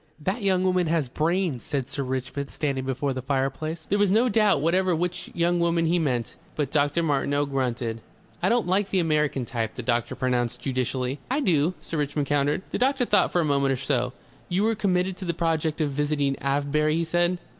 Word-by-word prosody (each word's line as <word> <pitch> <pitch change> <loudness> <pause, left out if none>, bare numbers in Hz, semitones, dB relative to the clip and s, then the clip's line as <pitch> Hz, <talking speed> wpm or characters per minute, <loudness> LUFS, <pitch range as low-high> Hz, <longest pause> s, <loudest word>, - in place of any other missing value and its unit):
"That 190 +9 -2
young 190 -2 +2
woman 185 -2 +2
has 155 -5 0
brains," 165 -2 0
said 135 -3 -3
Sir 140 - -3
Richmond, 130 +2 -3
standing 135 -3 -2
before 135 +1 -1
the 130 - -4
fireplace. 140 +4 -2
There 205 - +1
was 205 -1 +4
no 225 +6 +3
doubt 210 -6 +3
whatever 180 +4 +2
which 180 +2 -3
young 175 +1 +2
woman 170 -1 +2
he 170 +2 +2
meant. 125 -7 -1 0.2
But 145 -3 -1
Dr. 145 +2 +2
Martineau 145 -1 +1
grunted. 125 -4 -2 0.4
"I - - +2
don't 235 0 +2
like 190 +3 +1
the 190 - 0
American 150 -6 +1
type," 115 -3 -3
the 125 - -5
doctor 120 -1 0
pronounced 125 -1 0
judicially. 130 +1 -2
"I 265 +3 +1
do," 175 - +2
Sir 165 - -4
Richmond 145 0 -1
countered. 145 +4 +1
The - - -2
doctor 260 0 +2
thought 205 -4 +3
for 175 - +2
a - - 0
moment 140 -2 +2
or - - 0
so. 125 -2 -1 0.4
"You 190 +4 +1
are - - +2
committed 185 -3 0
to 190 - -6
the 170 -2 -1
project 160 -2 0
of 150 -2 +1
visiting 145 -1 0
Avebury?" 145 +2 +1
he 165 - +1
said. 175 +2 +1
150 Hz, 205 wpm, -25 LUFS, 135-180 Hz, 0.4 s, was